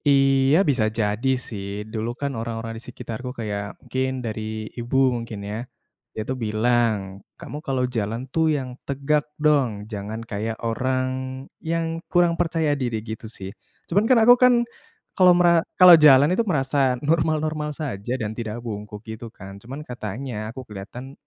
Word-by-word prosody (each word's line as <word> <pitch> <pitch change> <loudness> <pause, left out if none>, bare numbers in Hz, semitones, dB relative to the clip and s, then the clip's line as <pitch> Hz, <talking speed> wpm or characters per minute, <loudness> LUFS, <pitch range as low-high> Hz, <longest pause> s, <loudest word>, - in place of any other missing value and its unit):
Iya 135 +1 +4
bisa 125 -6 +2
jadi 110 +2 -1 0.2
sih, 100 -1 -5
dulu 110 +1 -2
kan 140 -1 -1
orang-orang 115 -1 -4
di - - -9
sekitarku 125 +1 -7
kayak 105 -2 -4
mungkin 130 0 -2 0.2
dari 110 0 -4
ibu 120 +2 -2 0.2
mungkin 115 -3 -5
ya, 105 +1 -4 0.5
dia 110 - -6
itu 130 - -2
bilang, 115 +1 +2 0.4
"Kamu 150 - -7
kalau 135 -4 0
jalan 115 0 -3
tuh 160 -1 +3
yang 130 -2 -4
tegak 145 +2 -1
dong, 135 -9 +2
jangan 110 +1 -6
kayak 110 +1 -3
orang 130 +3 0 0.5
yang 165 0 -2
kurang 175 -1 +4
percaya 165 -3 +1
diri," 125 -5 -1
gitu 110 0 -7
sih. 95 -3 -8 0.3
Cuman 205 +6 +1
kan 255 - +6
aku 245 - +10
kan 250 0 +7 0.6
kalau 180 -2 +6
mera 170 -1 +5 0.2
kalau 180 -1 +10
jalan 145 +3 +7
itu 195 - +2
merasa 135 -4 +2
normal-normal 155 -1 +1
saja 125 -7 -4
dan 110 0 -2
tidak 110 -1 -5
bungkuk 105 -1 -7
gitu 110 +1 -7
kan, 100 -1 -11
cuman 135 +7 -8
katanya 110 -2 -5
aku 130 +3 -8
keliatan 115 +6 -9
125 Hz, 155 wpm, -23 LUFS, 110-145 Hz, 0.6 s, aku